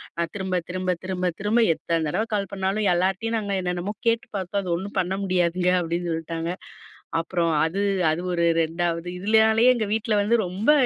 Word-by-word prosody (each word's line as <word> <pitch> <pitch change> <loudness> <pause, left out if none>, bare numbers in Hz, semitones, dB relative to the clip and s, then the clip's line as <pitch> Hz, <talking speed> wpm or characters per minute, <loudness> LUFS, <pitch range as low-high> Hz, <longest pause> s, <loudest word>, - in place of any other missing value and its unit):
நான் 170 -1 -2
திரும்ப, 190 -2 -2
திரும்ப, 185 0 -1
திரும்ப, 185 -1 -2
திரும்ப 210 +4 +2
எத்தன 165 0 -2
தடவ 210 +9 0
கால் 200 -2 -1
பண்ணாலும், 195 +2 0
எல்லார்கிட்டயும் 190 +6 0
நாங்க 205 -2 -2
என்னென்னமோ 180 +3 -2
கேட்டு 230 +3 +2
பார்த்தோம். 190 +2 -2
அது 185 - -6
ஒண்ணும் 195 +4 -6
பண்ண 185 +1 0
முடியாதுங்க. 180 -1 +1
அப்டின்னு 170 0 -2
சொல்ட்டாங்க. 165 +1 -4 0.7
அப்புறம் 170 0 0
அது, 190 +5 -2 0.3
அது 160 - -1
ஒரு 170 -1 +1 0.2
2வது. 170 +1 -2
இதுலனாலேயே 220 +4 +4
எங்க 220 -3 -1
வீட்ல 220 0 0
வந்து 230 +3 +3
ரொம்ப 195 +9 +1
185 Hz, 165 wpm, -24 LUFS, 175-205 Hz, 0.7 s, இதுலனாலேயே